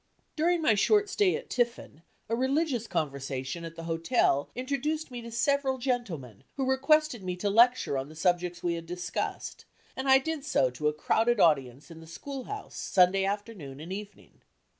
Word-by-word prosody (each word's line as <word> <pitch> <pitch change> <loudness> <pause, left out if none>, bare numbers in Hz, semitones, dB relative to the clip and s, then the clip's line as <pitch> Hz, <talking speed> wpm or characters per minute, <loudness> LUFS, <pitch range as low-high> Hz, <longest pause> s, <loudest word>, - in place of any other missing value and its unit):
During 335 +1 +1
my 230 - +5
short 415 - +3
stay 390 -1 +2
at 470 +1 -6
Tiffin, 240 -9 -2 0.3
a 230 - 0
religious 260 -1 0
conversation 140 +1 -3
at 165 0 -7
the 165 - -8
hotel 165 - +1
introduced 280 +4 -2
me 245 -1 -6
to 235 - -8
several 265 +3 +1
gentlemen 200 - -3
who 270 -2 -1
requested 270 -1 +2
me 180 -1 -3
to 200 +3 -1
lecture 235 - +4
on 135 +2 -6
the 155 - -12
subjects 175 +1 0
we 175 -1 +1
had 165 0 -6
discussed, 180 +1 -4 0.3
and 265 +1 -2
I 265 - +8
did 305 +1 -3
so 135 - +2
to 140 +5 -2
a 150 - +2
crowded 225 +9 +1
audience 140 -3 +2
in 165 - -10
the 160 - -13
school 270 - -7
house 420 0 -7
Sunday 190 +1 +3
afternoon 195 -9 -5
and 165 +5 -6
evening. 205 +1 -10
210 Hz, 180 wpm, -29 LUFS, 165-265 Hz, 0.3 s, I